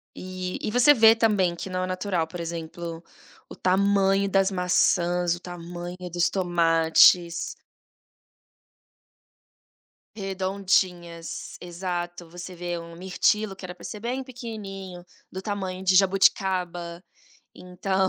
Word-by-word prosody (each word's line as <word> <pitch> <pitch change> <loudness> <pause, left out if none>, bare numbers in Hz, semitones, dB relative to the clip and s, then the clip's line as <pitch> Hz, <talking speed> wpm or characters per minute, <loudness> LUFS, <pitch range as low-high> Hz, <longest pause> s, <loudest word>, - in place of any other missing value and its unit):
E 185 0 -5
e 210 - -2
você 250 +5 +6
vê 225 -2 +7
também 205 -6 +2
que 190 - -6
não 185 0 -2
é - - -2
natural, 185 -2 -1
por 175 +2 -8
exemplo, 165 0 -6 0.5
o - - -9
tamanho 195 +1 +2
das 195 0 +3
maçãs, 180 -1 +2
o - - -10
tamanho 175 0 -7
dos 175 0 +2
tomates. 170 -1 +3 2.6
Redondinhas, 185 -4 -2
exato, 175 -1 -5
você 175 +2 -8
vê 175 0 -4
um 170 0 -9
mirtilo 195 +2 +1
que 190 - -14
era 180 - -7
para 180 - -13
ser 210 - -7
bem 255 +3 -3
pequenininho, 195 -8 -8 0.3
do 190 - -6
tamanho 190 -2 -4
de 185 0 +4
jabuticaba, 180 -3 +2 0.5
então, 190 +1 -1
185 Hz, 120 wpm, -25 LUFS, 175-195 Hz, 2.6 s, vê